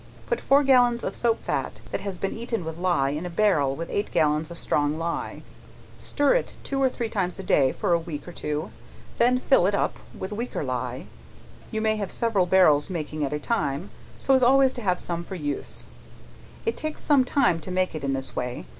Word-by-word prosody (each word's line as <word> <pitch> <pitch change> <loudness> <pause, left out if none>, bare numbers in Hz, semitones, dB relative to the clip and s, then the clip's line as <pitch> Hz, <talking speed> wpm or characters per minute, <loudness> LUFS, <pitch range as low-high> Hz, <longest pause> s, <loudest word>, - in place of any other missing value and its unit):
Put 485 - -1
four 280 +2 +4
gallons 245 -3 +4
of - - -3
soap 230 -2 0
fat - - -3
that - - -2
has 195 -2 -4
been 195 +2 -2
eaten 230 -5 -3
with 160 +1 -6
ley, 150 -6 +1
in 155 - -4
a 180 - -4
barrel 165 -8 +2
with 165 +2 -6
eight 205 +1 -1
gallons 150 +1 +1
of 170 - -7
strong 145 -1 0
ley, 170 +1 -3 0.6
stir 290 0 +2
it - - -1
two 275 0 -2
or 265 - +4
three 240 -2 -3
times 190 -5 -2
a 190 - -6
day, 135 -7 +3
for 175 - 0
a 170 - +3
week 165 -2 -7
or - - -6
two, 150 +1 -4 0.5
then 245 +2 +4
fill 255 -7 +4
it 200 - +1
up - - 0 0.2
with 190 - -5
weaker 230 -5 -3
ley, 125 -1 -3 0.6
you 220 - -2
may 215 0 +2
have 200 -3 -3
several 220 -6 +1
barrels 170 -5 +4
making 155 -3 -3
at 140 - -1
a 150 - -1
time, 150 -2 -2 0.3
so 270 - +2
as 260 - +5
always 265 +1 +5
to 245 - -6
have 180 -4 +1
some 170 -1 -3
for 190 - -7
use, 145 -4 -3 0.8
it 455 - 0
takes 310 0 -5
some 285 -3 +4
time 250 - +2
to 165 - -8
make 185 0 0
it 155 -3 -5
in 135 0 0
this 135 0 -4
way. 125 - -3
185 Hz, 215 wpm, -25 LUFS, 150-235 Hz, 0.8 s, as